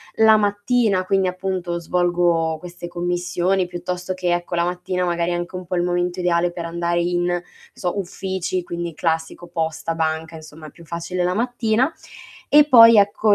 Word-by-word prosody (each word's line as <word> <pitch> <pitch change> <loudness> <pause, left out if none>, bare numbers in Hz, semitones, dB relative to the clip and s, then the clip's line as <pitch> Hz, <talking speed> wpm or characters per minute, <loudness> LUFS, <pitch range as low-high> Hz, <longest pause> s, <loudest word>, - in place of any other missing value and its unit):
La 220 0 +6
mattina 205 -1 +1
quindi, 190 -1 +2
appunto, 180 -2 -3
svolgo 175 -2 +1
queste 175 0 -9
commissioni 175 +1 -1
piuttosto 180 +1 -4
che, 180 -1 -1
ecco, 175 0 -2
la 170 0 +1
mattina 180 0 -2
magari 170 0 0
è - - 0
anche 175 +1 -5
un 180 0 -6
po' 180 +1 -3
il 175 - +1
momento 175 +1 -1
ideale 175 0 +1
per 170 -1 -6
andare 170 +1 -1
in, 175 0 0
non 175 0 -1 0.3
so, 180 +2 -3
uffici 190 -1 -3
quindi 170 -1 -5
classico 165 +1 -2
posta, 165 -1 -3
banca 160 0 -2
insomma 155 0 -11
è - - -13
più 170 - -16
facile 175 +2 -3
la 180 - +1
mattina 240 +3 +1 0.6
e 295 0 +6
poi 230 -3 +9
ecco 205 +1 +4
175 Hz, 175 wpm, -21 LUFS, 170-190 Hz, 0.6 s, poi